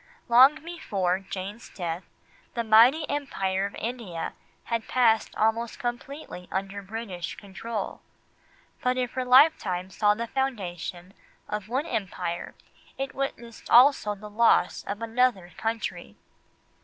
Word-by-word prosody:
Long 255 +5 +7
before 195 - -1
Jane's 195 +3 -7
death, 175 -1 -4 0.5
the 235 - 0
mighty 240 +8 +6
Empire 195 -9 -1
of 200 - -11
India 220 -8 -4 0.3
had 230 -1 -2
passed 230 -3 +2
almost 225 +2 0
completely 240 -5 -6
under 195 +1 -3
British 195 -3 -5
control. 205 +2 -6 0.8
But 250 0 +1
if 250 -1 -1
her 255 - -2
lifetime 250 - +4
saw 210 +1 +3
the 230 +2 -3
foundation 190 -8 -4 0.3
of 210 -1 -4
one 265 +5 0
Empire 180 - -3 0.4
it 270 0 -3
witnessed 240 -4 -5
also 245 -5 +6
the 210 +1 -10
loss 225 +3 +3
of 205 +3 -4
another 230 -6 +1
country. 225 0 -4
225 Hz, 120 wpm, -27 LUFS, 195-250 Hz, 0.8 s, Long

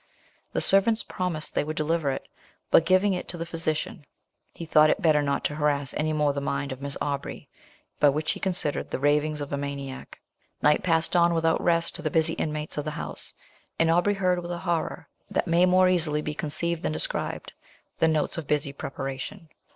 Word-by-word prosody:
The - - 0
servants 220 +3 +4
promised 175 -4 -3
they - - +1
would 155 +1 -4
deliver 155 -1 0
it; 135 - -4 0.4
but 165 - +5
giving 190 +2 +4
it 180 - -4
to 175 - -5
the 165 - -4
physician, 165 -2 -3 0.5
he 165 - -8
thought 155 -1 +5
it - - +2
better 155 -6 +4
not 140 -1 -1
to - - -1
harass 145 -3 0
any 155 +1 -1
more 150 -2 +1
the 140 - -3
mind 140 0 -2
of 130 +1 -7
Miss 140 0 -5
Aubrey 140 -1 -4 0.5
by, 145 - +6
what 155 +2 -2
he - - -4
considered, 180 -6 -2
the - - -2
ravings 150 +2 +1
of 145 0 -5
a - - 0
maniac. 140 -1 -6 0.4
Night 150 0 +4
passed 165 0 +1
on 170 -1 +4
without 165 0 +2
rest 170 -1 +2
to - - -8
the - - -1
busy 165 -1 +2
inmates 150 -1 -3
of 150 - -4
the - - -1
house; 150 - -6 0.4
and 165 0 +3
Aubrey 175 +5 +3
heard, 180 -2 +1
with 175 - -7
a 175 - -3
horror 170 -2 -2 0.2
that - - 0
may 170 +2 +4
more 185 0 +5
easily 155 -4 +1
be 150 - -3
conceived 160 +3 -1
than - - -1
described, - - -3 0.5
the 160 - +4
notes 160 +1 0
of 155 - -8
busy 145 -2 0
preparation. 135 +6 -6
155 Hz, 205 wpm, -26 LUFS, 145-170 Hz, 0.5 s, by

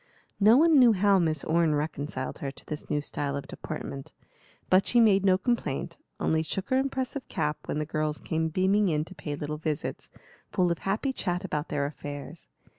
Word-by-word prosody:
No 215 +4 +7
one 320 -1 +6
knew 240 -3 +7
how 200 0 +4
Miss 155 -4 0
Orne 160 -1 +2
reconciled 145 -3 -3
her 140 - -3
to 135 - -13
this 150 - -6
new 150 - 0
style 140 -1 -3
of 140 - -6
deportment; 135 -1 -7 0.5
but 185 +1 +4
she 240 - +4
made 200 -4 +5
no 190 -1 +4
complaint, 185 - -2 0.2
only 160 0 +1
shook 185 +5 -3
her 260 - +4
impressive 265 0 -2
cap 150 0 -2
when - - -3
the 150 - -1
girls 155 -1 -1
came 160 0 -1
beaming 190 +4 +2
in 155 -1 0
to 190 - -11
pay 150 -5 -5
little 150 +1 -4
visits, 155 -2 -3 0.4
full 180 -1 +2
of 170 - -2
happy 215 +8 -1
chat 180 -4 -2
about 150 -4 -2
their 145 -2 0
affairs. 145 -1 -7
165 Hz, 190 wpm, -28 LUFS, 150-200 Hz, 0.5 s, No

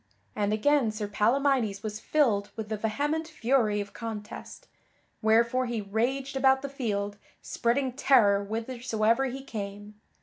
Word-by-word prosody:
And 205 0 0
again 260 +3 +3
Sir 215 -1 -4
Palamydes 230 -1 +1
was 215 -1 -4
filled 220 -8 +1
with 220 -2 -6
the 220 - -1
vehement 290 +9 -1
fury 240 -7 +1
of 205 0 -5
contest, 220 -2 -7 0.5
wherefore 235 +3 +3
he 235 -2 -2
raged 250 +7 -1
about 265 0 +3
the 280 - -3
field, 205 -7 -3 0.3
spreading 255 +2 0
terror 220 -7 +4
whithersoever 230 +2 0
he 265 +1 -5
came. 205 -3 -7
230 Hz, 135 wpm, -28 LUFS, 210-265 Hz, 0.5 s, terror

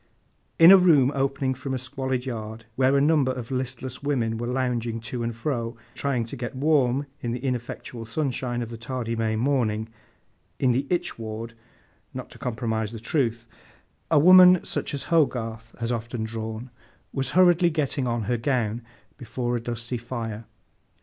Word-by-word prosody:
In 165 +2 +9
a 195 - +11
room 150 -8 +5
opening 135 -1 0
from 130 +1 -4
a - - -1
squalid 130 0 -3
yard, 110 -2 -6
where 135 +2 +3
a - - +4
number 145 -3 +3
of 125 -1 -6
listless 130 0 -4
women 120 -6 0
were 120 - -3
lounging 120 -3 -1
to 115 +2 -5
and 115 -1 -2
fro, 115 -3 -3 0.2
trying 130 -5 -1
to 115 - -8
get 120 0 -5
warm 140 -1 +2 0.2
in 120 -1 -2
the 125 - -3
ineffectual 120 -2 -4
sunshine 120 -1 -2
of 115 - -7
the 115 - -6
tardy 115 -1 -3
May 110 -1 0
morning—in 110 0 -2
the 135 +3 0
'Itch 175 -8 -1
Ward,' 115 +1 -6 0.6
not - - -7
to - - -14
compromise 110 -3 -2
the 115 - -6
truth—a 120 +3 -3
woman 180 +3 +8
such - - -2
as 140 - -5
HOGARTH 115 -7 0
has 115 0 -2
often 120 0 -3
drawn, 110 +2 -5 0.4
was 135 -1 -2
hurriedly 175 -1 +6
getting 145 -4 -1
on 120 -1 -1
her 120 +4 0
gown 120 -3 0 0.4
before 120 -1 -2
a 120 - -2
dusty 120 +1 -4
fire. 115 -2 -5
125 Hz, 165 wpm, -25 LUFS, 115-135 Hz, 0.6 s, a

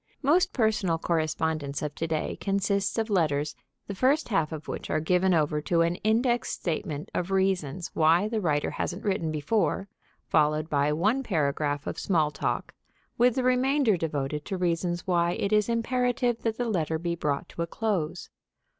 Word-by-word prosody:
Most 320 +7 +3
personal 215 -8 +1
correspondence 155 -3 -1
of 150 -1 -3
to 165 - -3
day 160 -1 -2
consists 200 +1 0
of 225 -1 -1
letters 150 -5 +1 0.3
the 200 - -5
first 265 +9 +2
half 165 -8 +1
of 155 -1 -7
which - - -5
are 155 - +1
given 180 +4 +2
over 150 -3 +2
to 165 +2 +1
an 170 +1 +1
indexed 240 +3 +1
statement 155 -3 -3
of 180 - -2
reasons 190 -4 0
why 165 +5 +4
the 220 -1 -2
writer 150 -5 0
hasn't 180 +4 -4
written 180 -6 0
before, 195 +6 0 0.4
followed 155 +1 +2
by 145 0 +2
one 210 - +1
paragraph 145 - -1
of - - -4
small 160 -6 +1
talk, 140 - -3 0.5
with 245 0 +4
the 260 - 0
remainder 255 -2 +3
devoted 150 -3 -2
to 195 - -3
reasons 175 0 -1
why 175 -1 +2
it 200 +3 -1
is 210 +1 +3
imperative 245 0 0
that 225 -1 -1
the 245 - -1
letter 160 -7 0
be 170 +1 -2
brought 150 -4 -2
to - - -6
a 170 - -1
close. 195 -5 -2
175 Hz, 170 wpm, -27 LUFS, 155-215 Hz, 0.5 s, why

